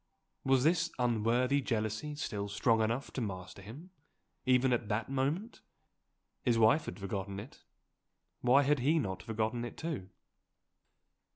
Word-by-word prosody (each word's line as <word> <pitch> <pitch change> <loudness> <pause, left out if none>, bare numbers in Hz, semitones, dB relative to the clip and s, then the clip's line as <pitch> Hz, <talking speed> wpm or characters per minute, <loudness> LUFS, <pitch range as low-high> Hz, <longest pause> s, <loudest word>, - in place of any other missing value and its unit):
Was 135 -1 +3
this 165 +2 +3
unworthy 125 +3 +2
jealousy 115 +4 -2
still 105 -9 -3
strong 110 +2 +2
enough 115 +5 -1
to 130 - -3
master 95 -3 -5
him, 140 - -11 0.6
even 130 0 +4
at 120 -3 -1
that 110 +4 -1
moment? 150 - -1 0.8
His 120 -3 +2
wife 115 +7 +5
had - - -6
forgotten 100 0 -4
it. 110 +7 -11 0.8
Why 130 +3 +5
had 145 0 +2
he 150 +6 +3
not 95 - -2
forgotten 110 +4 -2
it 120 - -7
too? 150 - -4
120 Hz, 135 wpm, -33 LUFS, 110-140 Hz, 0.8 s, wife